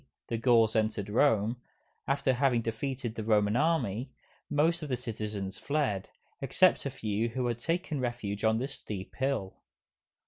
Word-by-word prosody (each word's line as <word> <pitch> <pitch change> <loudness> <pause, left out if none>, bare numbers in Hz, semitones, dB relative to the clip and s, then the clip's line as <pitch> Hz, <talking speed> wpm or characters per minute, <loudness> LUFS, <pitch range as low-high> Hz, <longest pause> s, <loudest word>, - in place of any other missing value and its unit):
the 115 - 0
Gauls 115 -2 +4
entered 110 -2 0
Rome, 115 -2 +3 0.5
after 140 -1 +2
having 125 -2 +2
defeated 120 +1 -3
the 110 - -4
Roman 105 -1 +3
Army, 135 -6 +1 0.4
most 160 +4 +2
of 150 - -5
the 125 - 0
citizens 105 -5 -5
fled, 140 -10 -1 0.3
except - - +3
a - - -1
few 110 +2 -1
who 125 +2 -2
had 120 -1 -1
taken 165 +1 -1
refuge 120 -5 -3
on 110 0 +3
this 135 +4 -2
steep 95 -3 -7
hill. 130 -8 -1
120 Hz, 150 wpm, -30 LUFS, 110-135 Hz, 0.5 s, Gauls